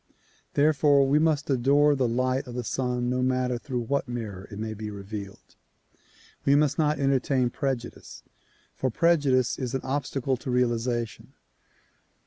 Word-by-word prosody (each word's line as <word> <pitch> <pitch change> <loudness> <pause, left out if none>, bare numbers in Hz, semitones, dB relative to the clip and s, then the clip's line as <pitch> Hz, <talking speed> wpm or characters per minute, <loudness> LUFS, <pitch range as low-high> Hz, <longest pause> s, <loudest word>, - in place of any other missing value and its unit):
Therefore 145 -1 +4
we 145 +3 +3
must 155 -2 +1
adore 140 +3 +3
the 130 -3 +1
light 130 +3 0
of 120 - -8
the 125 - -3
Sun 125 0 -1
no 125 +1 0
matter 125 -1 0
through 125 -1 -3
what 140 +3 -1
mirror 110 -6 -6
it 100 - -9
may 110 +1 -4
be 105 0 -6
revealed. 100 0 -8 0.9
We 140 - +4
must 145 0 +2
not 150 -1 +2
entertain 135 -2 +1
prejudice, 130 -3 -5 0.5
for 130 - -1
prejudice 135 -4 +2
is 125 -1 -3
an 130 - -1
obstacle 135 -1 -1
to 130 - -7
realization. 120 -2 -1
130 Hz, 145 wpm, -26 LUFS, 120-140 Hz, 0.9 s, Therefore